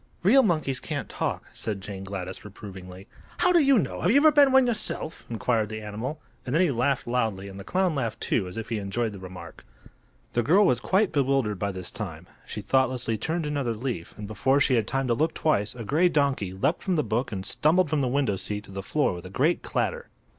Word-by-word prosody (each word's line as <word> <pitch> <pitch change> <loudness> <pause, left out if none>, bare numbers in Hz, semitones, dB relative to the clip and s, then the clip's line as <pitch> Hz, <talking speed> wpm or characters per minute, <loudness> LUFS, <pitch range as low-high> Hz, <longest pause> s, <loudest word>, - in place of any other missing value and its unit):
"Real 245 +9 +7
monkeys 155 - 0
can't 150 -4 -4
talk," - - -3
said 105 -3 -4
Jane 95 0 -7
Gladys, 95 -1 -6
reprovingly. 95 -2 -10 0.3
"How 360 - +3
do 350 - +6
you 275 -4 +5
know? 205 - -1
Have 175 - +2
you 245 - +5
ever 310 +2 +7
been 285 -2 +6
one 265 -1 +6
yourself?" 215 -8 -2
inquired 115 -2 0
the 110 0 -6
animal; 110 +9 -5 0.2
and 125 - -3
then 165 - +4
he 170 - +2
laughed 135 +2 0
loudly, 110 -5 -1
and 100 0 -9
the - - -7
clown 185 - +1
laughed, 120 -6 -2
too, 100 -6 0
as 90 - -8
if 110 -1 -5
he 115 -2 -1
enjoyed 110 +3 -2
the 100 - -9
remark. 95 -1 -10 0.7
The 120 - +2
girl 180 - +5
was 125 -10 +3
quite 190 - +2
bewildered 135 -8 +1
by 100 0 -1
this 95 -1 -5
time. - - -6 0.2
She - - -5
thoughtlessly 130 -4 +1
turned 160 +7 -2
another 140 -6 -1
leaf, 115 -7 -5
and 105 - -6
before 130 +6 +1
she 140 -1 +3
had 115 -4 +2
time 135 +1 0
to 120 - +2
look 160 +7 0
twice 115 -9 +1
a 120 - -6
gray 165 - +3
donkey 140 - +1
leaped 95 - 0
from 185 - 0
the 150 - +2
book 120 +1 -1
and 95 -2 -4
stumbled 170 +9 +2
from 155 -2 +2
the 130 - +1
window 125 -6 +1
seat 105 +2 -4
to 100 - -14
the 95 0 -5
floor 145 +3 0
with 90 +1 -8
a - - -10
great 145 - +1
clatter. 485 0 -2
125 Hz, 230 wpm, -26 LUFS, 105-155 Hz, 0.7 s, Real